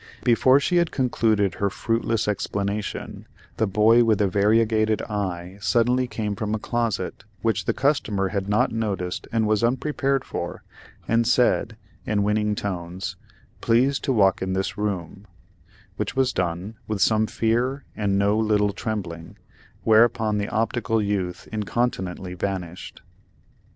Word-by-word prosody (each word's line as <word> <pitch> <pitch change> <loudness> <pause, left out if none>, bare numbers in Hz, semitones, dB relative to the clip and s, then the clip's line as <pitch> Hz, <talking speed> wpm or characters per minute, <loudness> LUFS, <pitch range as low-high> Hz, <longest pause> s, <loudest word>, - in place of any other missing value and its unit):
Before 130 +3 +5
she 175 +5 +1
had 170 -1 +3
concluded 110 -7 +1
her 100 +3 -1
fruitless 115 +1 -1
explanation, 100 0 -3 0.3
the 110 - +1
boy 110 +4 +5
with 110 -2 +3
the 100 - +2
variegated 110 +2 +2
eye 95 -3 -4
suddenly 125 +3 +2
came 105 -4 -3
from 105 +2 -2
a - - -1
closet 110 -5 -2 0.2
which 115 -1 0
the - - +1
customer 110 -9 +1
had 100 0 -3
not 105 - +2
noticed 100 -5 -3
and 115 -1 +1
was 110 +1 +1
unprepared 135 +2 0
for, - - -5 0.4
and 115 0 +2
said, 120 -2 +2 0.3
in 105 -2 0
winning 105 0 +1
tones, 90 -2 -4 0.5
"Please 130 +4 +3
to - - -1
walk 100 -6 +3
in 95 0 -1
this 95 0 -2
room," 100 -1 -4 0.7
which 105 +3 -3
was 130 -1 +2
done, 90 +5 -3
with 110 -2 -2
some 110 +1 +3
fear 120 +5 0
and 100 -2 0
no 100 +1 +3
little 105 -2 +2
trembling, 90 -6 -5 0.5
whereupon 110 -1 +4
the 100 - -2
optical 115 0 0
youth 100 -4 -2
incontinently 100 -4 -2
vanished. 90 -1 -5
105 Hz, 140 wpm, -24 LUFS, 100-115 Hz, 0.7 s, Before